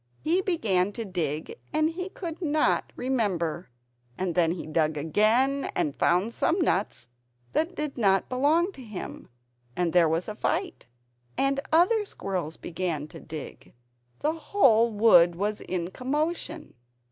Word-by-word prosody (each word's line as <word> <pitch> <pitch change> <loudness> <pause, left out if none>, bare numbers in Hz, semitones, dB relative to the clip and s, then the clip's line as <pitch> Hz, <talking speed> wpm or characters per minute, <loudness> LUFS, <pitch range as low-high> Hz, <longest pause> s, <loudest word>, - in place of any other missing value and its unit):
He 345 +4 +2
began 205 - +1
to 230 0 -4
dig, 160 -5 -3
and 310 +1 +2
he 365 +3 -5
could 345 -3 -7
not 305 -2 +1
remember. 190 - -1 0.5
And 185 -2 -1
then 170 -1 +2
he 175 - -6
dug 155 0 0
again 225 - +2
and 145 - 0
found 185 +7 +2
some 340 +9 +1
nuts 205 - 0 0.5
that 330 +3 0
did 300 -4 -4
not 195 -3 +3
belong 305 +8 +2
to 275 - -13
him; 215 -6 -8 0.5
and 175 -2 0
there 170 -3 +5
was 165 +3 -1
a 215 - -4
fight. 355 - -2 0.5
And 275 0 +1
other 365 +7 +4
squirrels 185 - -4
began 165 -4 -3
to - - -11
dig, 155 -6 -9 0.5
the 305 +2 +1
whole 270 - +3
wood 205 -6 +5
was 205 +3 -2
in 180 -1 -3
commotion! 305 - -3
220 Hz, 145 wpm, -27 LUFS, -, 0.5 s, there